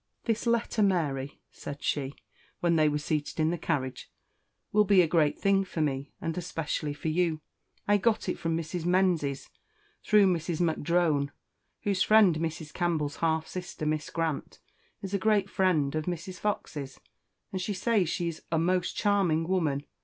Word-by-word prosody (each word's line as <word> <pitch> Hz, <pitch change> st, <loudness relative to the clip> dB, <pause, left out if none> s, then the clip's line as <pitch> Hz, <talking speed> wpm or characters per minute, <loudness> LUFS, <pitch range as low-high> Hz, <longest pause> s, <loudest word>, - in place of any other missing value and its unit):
"This 230 Hz, 0 st, -1 dB
letter, 235 Hz, -1 st, +1 dB
Mary," 150 Hz, -9 st, 0 dB
said 145 Hz, 0 st, -8 dB
she, 140 Hz, -1 st, -1 dB, 0.4 s
when 170 Hz, -1 st, +2 dB
they 155 Hz, -1 st, +4 dB
were 150 Hz, -, 0 dB
seated 150 Hz, +1 st, -2 dB
in 160 Hz, +1 st, +3 dB
the 175 Hz, -, -1 dB
carriage, 130 Hz, -6 st, -2 dB, 0.6 s
"will 210 Hz, 0 st, +5 dB
be 195 Hz, -2 st, +5 dB
a -, -, +1 dB
great 155 Hz, -3 st, +2 dB
thing 195 Hz, 0 st, +3 dB
for 180 Hz, -3 st, -6 dB
me, 140 Hz, -2 st, -1 dB
and 165 Hz, -1 st, -3 dB
especially 155 Hz, -3 st, -3 dB
for 160 Hz, -, -3 dB
you. 165 Hz, -1 st, +1 dB, 0.5 s
I 205 Hz, 0 st, +5 dB
got 220 Hz, +2 st, +1 dB
it -, -, -2 dB
from 165 Hz, 0 st, -1 dB
Mrs. 165 Hz, +1 st, -4 dB
Menzies, 175 Hz, -6 st, +1 dB, 0.5 s
through 210 Hz, -2 st, +5 dB
Mrs. 170 Hz, -3 st, 0 dB
M'Drone, 160 Hz, -3 st, +1 dB, 0.5 s
whose 200 Hz, -2 st, 0 dB
friend, 210 Hz, -7 st, +5 dB
Mrs. 160 Hz, -2 st, -4 dB
Campbell's 160 Hz, -5 st, -1 dB
half 160 Hz, -1 st, +1 dB
sister, 180 Hz, -4 st, -6 dB
Miss 155 Hz, 0 st, -1 dB
Grant, 165 Hz, -3 st, -3 dB, 0.5 s
is 195 Hz, 0 st, -5 dB
a 200 Hz, -, +1 dB
great 205 Hz, -1 st, +2 dB
friend 160 Hz, -7 st, +2 dB
of 155 Hz, -1 st, -2 dB
Mrs. 180 Hz, +1 st, -5 dB
Fox's, 145 Hz, -9 st, -3 dB, 0.5 s
and 190 Hz, -, -3 dB
she 200 Hz, +2 st, -2 dB
says 195 Hz, -3 st, +1 dB
she 170 Hz, 0 st, -1 dB
is 165 Hz, -2 st, -5 dB
a 165 Hz, -, +2 dB
most 180 Hz, +2 st, +1 dB
charming 185 Hz, -6 st, +2 dB
woman. 155 Hz, -7 st, 0 dB
165 Hz, 170 wpm, -29 LUFS, 155-190 Hz, 0.6 s, will